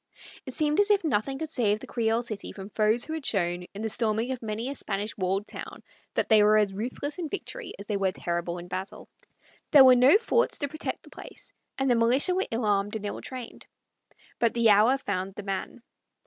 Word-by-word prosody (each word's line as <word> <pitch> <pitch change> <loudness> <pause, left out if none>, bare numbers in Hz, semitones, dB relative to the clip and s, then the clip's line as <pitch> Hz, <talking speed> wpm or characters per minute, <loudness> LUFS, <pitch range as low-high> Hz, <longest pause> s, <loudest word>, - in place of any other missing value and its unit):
It 260 - -5
seemed 300 +1 +1
as 410 0 +5
if 410 -2 +3
nothing 270 -2 0
could 315 +2 -4
save 215 -8 +1
the - - -8
Creole 230 0 0
City 215 -4 -4
from 195 0 -9
foes 215 +3 +1
who 315 - -5
had 320 -2 -4
shown, 175 -6 0
in 210 - -5
the - - 0
storming 225 +2 0
of 255 - -4
many 220 +2 -3
a 275 - -3
Spanish 210 -4 -4
walled 195 +1 -1
town, - - -8 0.3
that - - +1
they 220 -2 +6
were 210 +1 +5
as 205 -2 +2
ruthless 255 - -4
in 330 -3 -3
victory 465 +4 -6
as 200 - -9
they 210 -1 -1
were 195 -1 +1
terrible 170 -1 -3
in 175 0 -8
battle. 185 +2 -6 0.6
There 285 -4 +8
were 255 - +9
no 255 +9 +6
forts 470 +1 +1
to 285 - -1
protect 310 +3 -5
the - - -17
place, - - -10 0.2
and 270 - 0
the 250 - +4
militia 245 +9 +3
were 380 +2 0
ill 225 0 -2
armed 205 0 +1
and 215 -1 -4
ill 205 - -4
trained. 255 -3 -8 0.7
But 235 -1 +2
the 230 -2 +5
hour 220 +6 +5
found 195 -6 -4
the 205 - -7
man. 195 +4 -5
225 Hz, 220 wpm, -27 LUFS, 205-270 Hz, 0.7 s, were